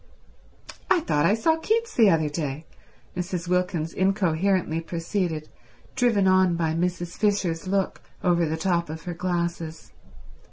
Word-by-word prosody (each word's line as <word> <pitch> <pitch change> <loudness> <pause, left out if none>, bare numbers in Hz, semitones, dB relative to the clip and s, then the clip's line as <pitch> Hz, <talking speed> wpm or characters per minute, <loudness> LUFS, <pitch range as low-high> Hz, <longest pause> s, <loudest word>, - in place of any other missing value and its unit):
"I 350 - +4
thought 150 - +2
I 200 - +4
saw 320 +8 +2
Keats 455 +5 0
the 220 -4 +5
other 160 -3 +2
day," 150 0 -4 0.5
Mrs. 180 -1 -3
Wilkins 180 -3 0
incoherently 185 -3 +1
proceeded, 165 -1 -3 0.5
driven 235 -7 +3
on 185 -2 +4
by 165 -2 0
Mrs. 175 +1 -2
Fisher's 190 -5 0
look 195 0 -1 0.2
over 175 -2 +3
the 160 +1 -2
top 170 -1 0
of 160 +1 -7
her 175 - -4
glasses. 170 -2 -3
175 Hz, 135 wpm, -25 LUFS, 165-195 Hz, 0.5 s, the